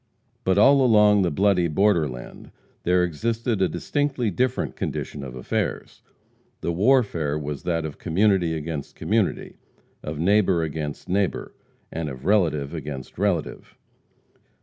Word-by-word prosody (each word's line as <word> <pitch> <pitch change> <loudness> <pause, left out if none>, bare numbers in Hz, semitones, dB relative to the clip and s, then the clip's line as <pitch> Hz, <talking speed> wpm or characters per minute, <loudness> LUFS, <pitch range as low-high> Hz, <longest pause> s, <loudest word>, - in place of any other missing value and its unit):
But 95 0 +2
all 135 +5 +6
along 105 -4 +5
the 90 - +2
bloody 90 +2 +2
borderland 80 -7 0 0.3
there 90 +1 +2
existed 110 +5 -1
a 95 - +3
distinctly 140 -6 -1
different 125 +6 -1
condition 70 - -4
of 65 -2 -8
affairs. 65 - -3 0.6
The 85 - -1
warfare 90 - +2
was 75 -2 -5
that 85 -2 0
of 75 - -7
community 90 -1 +2
against 75 -2 -5
community, 110 -2 -1 0.4
of 75 0 -5
neighbor 95 0 +3
against 75 -2 -5
neighbor, 95 +1 -1 0.4
and 80 -1 -3
of 65 +1 -9
relative 80 -8 +1
against 75 -2 -7
relative. 95 -5 -2
90 Hz, 125 wpm, -24 LUFS, 75-105 Hz, 0.6 s, all